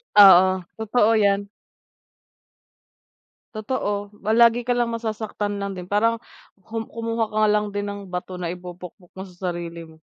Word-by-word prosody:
Oo, 190 -2 +7
totoo 220 0 +2
yan. 200 -1 +2 2.1
Totoo, 205 -2 -3 0.2
lagi 235 +1 +5
ka 245 - -1
lang 240 -1 +1
masasaktan 215 -2 -4
lang 200 -1 -4
din. 180 - -6
Parang 210 +5 +1 0.5
ku 225 +1 -5
kumuha 230 -1 -2
ka 215 0 +1
lang 210 0 +1
din 205 - -1
ng 205 0 -5
bato 180 0 -6
na 175 - -3
ipupukpok 180 +2 -9
mo 190 - -9
sa 180 0 -4
sarili 170 -1 -7
mo. 160 -1 -17
205 Hz, 140 wpm, -23 LUFS, 180-220 Hz, 2.1 s, Oo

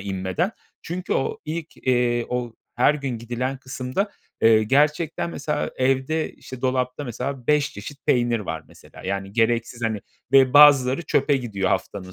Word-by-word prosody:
inmeden. 95 - -2 0.3
Çünkü 180 +2 -4
o 135 - -1
ilk, 160 +1 -5
eee, 120 -2 +1
o 125 -2 -3 0.2
her 125 +5 +4
gün 135 -5 -4
gidilen 120 +3 -3
kısımda, 130 +9 -3 0.3
eee, 110 -1 +6
gerçekten 150 +7 +1
mesela 150 -2 -2
evde, 135 +5 0
işte, 130 -1 -11
dolapta 130 +2 -1
mesela 125 +1 -5
5 150 -1 +2
çeşit 130 +8 -10
peynir 120 -2 +2
var 80 -6 -5
mesela, - - -15
yani, 95 +1 -3
gereksiz, 115 +1 0
hani, 110 -2 -1 0.3
ve 135 -2 +6
bazıları 145 -1 +7
çöpe 145 -2 +2
gidiyor 105 -7 -2
haftanın 95 0 -3
125 Hz, 150 wpm, -23 LUFS, 115-145 Hz, 0.3 s, bazıları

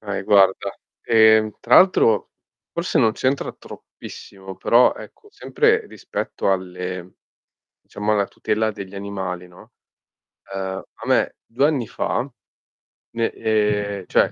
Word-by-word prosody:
Okay, 100 -2 -4
guarda, 95 -1 +3 0.3
ehm, 110 -1 +4
tra 120 - +4
l'altro 115 - +4 0.4
forse 170 +1 -1
non 110 -4 +4
c'entra 130 +4 -1
troppissimo, 95 -1 -12
però 120 +2 +4
ecco, 415 - -13
sempre 450 0 +1
rispetto - - -4
alle 90 -1 -4 0.7
diciamo 105 +1 -2
alla 100 -2 +1
tutela 110 +1 -1
degli 100 -2 -9
animali, 95 -3 -5
no. 90 - -17 0.8
Ehm, 95 0 -4
a - - -11
me - - +2
2 130 +5 0
anni 135 -8 -1
fa, 130 +3 -2 0.9
ne 115 -1 0
ehm, 105 -3 -1
cioè, - - +3
105 Hz, 120 wpm, -21 LUFS, 95-115 Hz, 0.9 s, ehm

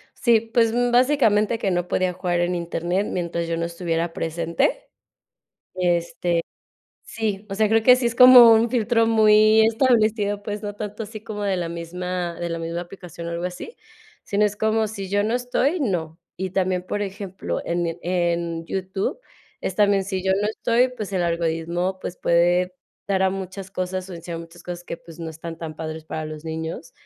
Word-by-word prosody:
Sí, 235 -3 +4
pues, 230 -2 +4
mm, 245 0 +1
básicamente 240 -4 +3
que 195 - 0
no 175 0 -1
podía 185 0 0
jugar 175 -1 -1
en 175 +1 0
Internet 175 +3 -1
mientras 170 -1 -2
yo 165 0 -1
no 170 - -1
estuviera 170 -1 -2
presente, 170 - -1 0.9
este, 175 -1 0 0.6
sí, 210 -2 -3
o 195 - -2
sea, 215 0 +2
creo 225 0 +3
que 250 +2 +7
sí 250 -1 0
es 235 - -1
como 250 -2 +10
un 225 +1 +4
filtro 230 -1 +2
muy 215 0 +5
establecido, 220 -4 +2
pues, 210 0 -5
no 205 -1 -5
tanto 210 +1 -6
así 215 0 -8
como 215 -2 -6
de 195 -2 0
la 170 -2 -2
misma 175 +1 -4
de 175 - -3
la 165 0 -3
misma 165 +1 -4
aplicación 175 -2 -10
o - - -4
algo 170 +1 -4
así, 180 - -6 0.5
sino 205 +1 +1
es 210 0 0
como 220 0 +1
si 200 -3 -6
yo 205 +1 +1
no 225 +3 0
estoy, 250 +6 0
no. 170 - -2 0.2
Y 190 +1 -3
también, 185 -1 0
por 205 +2 -2
ejemplo, 195 -1 -4
en 175 +1 -1
mi 170 0 -3
en 170 -2 -1
YouTube 190 - -3 0.4
es 185 - -3
también 200 -2 +3
si 190 -1 -3
yo 190 0 +2
no 210 - +1
estoy, 235 +3 +2
pues 215 -5 -7
el 185 - 0
algoritmo, 170 +2 -1
pues 180 - -6
puede 175 +2 +2 0.3
dar 190 -1 +1
a 190 - +3
muchas 190 0 -6
cosas 185 0 -3
o - - -6
enseñar 170 0 -6
muchas 165 +1 -13
cosas 175 0 -7
que, - - -5
pues 165 0 -15
no 165 -1 -5
están 165 +1 -8
tan 160 -2 -6
padres 160 -1 -6
para 155 0 -5
los 155 0 -8
niños. 160 +1 -5
185 Hz, 195 wpm, -23 LUFS, 170-215 Hz, 0.9 s, como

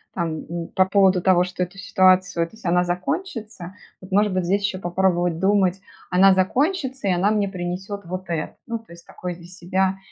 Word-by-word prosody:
там, 165 -3 -3
м, 170 -1 -4
по 185 - +3
поводу 190 -2 +3
того, 180 -1 +4
что 180 0 -6
эту 180 +2 -8
ситуацию 185 -3 +2
ты 220 - -17
сама 180 -3 +1
закончится, 195 - -4 0.3
вот 185 +1 -13
может 205 0 +3
быть 185 -2 0
здесь 200 +3 +1
еще 195 -2 -1
попробовать 175 -2 0
думать: 190 -1 +2 0.3
"Она 190 +1 +6
закончится 265 - 0
и - - +3
она 180 +3 +2
мне 210 -2 +1
принесет 185 +2 -5
вот 185 +1 -6
это". 165 -2 -3
Ну, 230 -1 -4
то 225 -6 -16
есть 170 0 -15
такой 180 -1 -6
для 170 -1 -14
себя 185 +1 -1
185 Hz, 190 wpm, -22 LUFS, 175-200 Hz, 0.3 s, Она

